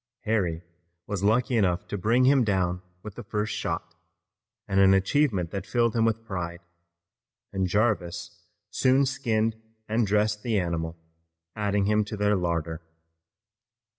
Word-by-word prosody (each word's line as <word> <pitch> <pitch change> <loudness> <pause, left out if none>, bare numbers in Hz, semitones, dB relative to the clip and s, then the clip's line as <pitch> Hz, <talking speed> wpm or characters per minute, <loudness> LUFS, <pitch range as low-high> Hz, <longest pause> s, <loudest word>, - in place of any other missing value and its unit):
Harry 90 -6 -1 0.4
was 100 -3 -3
lucky 120 +5 +2
enough 95 -5 +1
to - - -4
bring 115 +6 +2
him 135 -1 +5
down 90 -4 0 0.2
with 105 - -7
the 120 - -8
first 105 0 -2
shot, 85 0 -3 0.7
an 95 -1 +5
achievement 95 - +1
that 100 -2 -4
filled 120 -2 +1
him 115 -1 +3
with 115 0 -1
pride, 85 -4 -5 0.9
and 95 -1 0
Jarvis 100 -3 -1 0.3
soon 130 +2 +3
skinned 115 -5 -1 0.3
and 110 0 +1
dressed 105 +1 +1
the 110 -3 0
animal, 85 -2 -3 0.6
adding 105 -2 0
him 105 +1 +3
to 105 0 -6
their 105 0 +2
larder. 85 -3 -2
105 Hz, 135 wpm, -26 LUFS, 90-115 Hz, 0.9 s, him